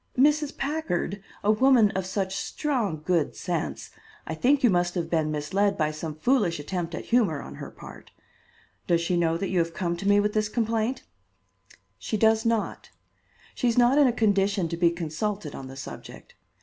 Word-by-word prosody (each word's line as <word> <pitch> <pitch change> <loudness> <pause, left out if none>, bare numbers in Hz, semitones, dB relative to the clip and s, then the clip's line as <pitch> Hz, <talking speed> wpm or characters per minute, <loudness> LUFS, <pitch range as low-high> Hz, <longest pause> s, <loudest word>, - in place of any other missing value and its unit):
"Mrs. 295 +2 +3
Packard? 270 - -2 0.2
a 210 - +4
woman 230 -2 +5
of 190 -1 -3
such 190 0 -2
strong 210 - -2
good 170 -5 +1
sense! 175 -4 -4 0.3
I - - -4
think 265 - +2
you 240 - +5
must 175 0 +1
have 175 -2 -3
been 160 -2 +1
misled 195 +7 0
by 155 -1 +1
some 155 0 -6
foolish 190 - +1
attempt 170 +2 -4
at - - -6
humor 215 - +2
on 70 - -9
her - - -6
part. - - -13 0.8
Does 170 -1 +3
she 170 +1 0
know 165 -1 +1
that 195 +2 -3
you 185 - +1
have 165 0 -1
come 175 -2 -1
to 195 - -4
me 205 0 +5
with 210 0 0
this 215 -1 0
complaint?" 230 +2 -1 1.0
"She 215 - -2
does 220 +1 +3
not. 230 -2 -1 0.6
She 250 - -1
is 235 - +1
not 245 +4 +5
in 285 - +6
a - - +3
condition 200 -4 +1
to 170 - -2
be 170 0 +4
consulted 170 +1 -3
on 135 - -7
the 135 - -10
subject. 135 - -10
195 Hz, 190 wpm, -26 LUFS, 170-230 Hz, 1.0 s, in